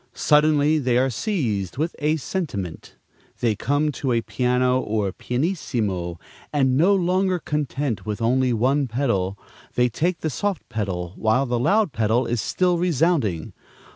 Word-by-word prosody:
Suddenly 150 0 +3
they 125 -3 +1
are 130 +1 +2
seized 110 - -2
with 160 +4 -1
a 150 +1 +2
sentiment! 135 - -5 0.4
They 115 -3 +1
come 145 +6 0
to 135 -3 -2
a 115 - +2
piano 125 0 +1
or 105 -5 -1
pianissimo, 115 - -2 0.3
and, 135 -3 +2
no 180 +8 +4
longer 185 0 +1
content 145 - -2
with 105 0 -4
one 130 +3 +2
pedal, 110 -6 -1 0.4
they 125 0 +3
take 165 +8 -1
the 155 - -1
soft 200 0 -2
pedal 90 -5 -3
while 110 +5 +2
the 120 -2 -1
loud 205 - +2
pedal 115 +3 +1
is 120 -2 -1
still 180 -2 +1
resounding. 160 - +1
130 Hz, 140 wpm, -23 LUFS, 110-155 Hz, 0.4 s, no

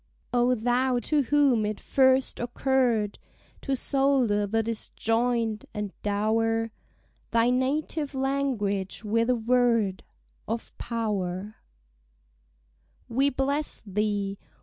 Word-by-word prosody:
O 245 +1 +3
thou 245 +2 +1
to 290 +5 +1
whom 275 -4 +3
it 210 0 -2
first 260 -1 +2
occurr'd 240 -3 0 0.4
To 275 - -1
solder 260 -7 +2
the 225 +2 +1
disjoin'd, 225 0 -1
and 210 -2 -4
dower 225 +2 0 0.6
Thy 235 +1 +3
native 285 +3 -1
language 255 -9 -1
with 230 +3 +1
a 250 - +4
word 230 -4 +2 0.4
Of 225 +1 -4
power: 210 -3 -3 1.5
We 270 +4 +2
bless 280 +2 -1
thee! 200 -1 -1
230 Hz, 100 wpm, -27 LUFS, 210-260 Hz, 1.5 s, a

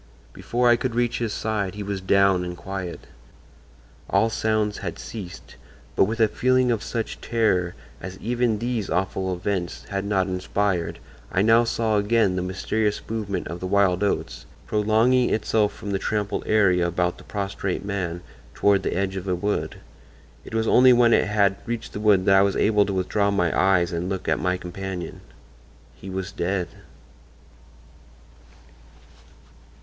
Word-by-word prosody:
Before 125 +1 0
I 120 0 +6
could 120 -1 -3
reach 120 0 0
his 115 -2 -2
side 100 -3 -2
he 105 - -5
was 100 -1 -4
down 95 -1 +3
and 90 0 -6
quiet. 95 -2 -6 1.1
All 110 +4 +2
sounds 110 -2 0
had - - -5
ceased, 95 -6 -9 0.4
but - - +5
with 110 +3 -4
a 110 - +5
feeling 130 +2 +2
of 115 -3 0
such 115 0 -4
terror 95 -7 +1 0.3
as 95 +1 -7
even 120 0 0
these 115 -2 -2
awful 95 +1 -1
events 90 -1 -3
had 100 -1 -2
not 100 -2 +1
inspired 95 -1 -1 0.3
I 95 - +2
now 115 +2 +5
saw 115 -2 0
again 105 -2 +2
the 90 - -1
mysterious 105 +3 -1
movement 105 -3 -3
of 85 +2 -6
the 95 - -4
wild 95 -2 +2
oats, 100 - -2 0.2
prolonging 110 +4 +2
itself 110 -1 +1
from 100 0 -7
the 95 - 0
trampled 105 -1 -2
area 90 -5 +3
about 90 +1 -1
the - - -13
prostrate 100 -2 -3
man 90 -4 -3 0.3
toward 100 -1 +3
the - - -2
edge 95 0 -1
of 95 +1 -6
a 90 - +1
wood. 100 +4 -2 0.7
It - - -8
was 110 0 +1
only 125 +2 +6
when 120 -1 +5
it - - +3
had 100 -1 +2
reached 115 -1 -4
the - - -4
wood 105 -3 +3
that 95 - +5
I - - +6
was 100 0 +2
able 105 -2 +3
to 100 - -2
withdraw 100 +2 +1
my 95 -4 +1
eyes 90 -2 +3
and 85 +2 -2
look 95 -1 -4
at - - +1
my 90 0 0
companion. 90 0 -6 0.7
He 95 - -11
was 95 0 -4
dead." 90 -1 -2
100 Hz, 165 wpm, -24 LUFS, 95-110 Hz, 1.1 s, I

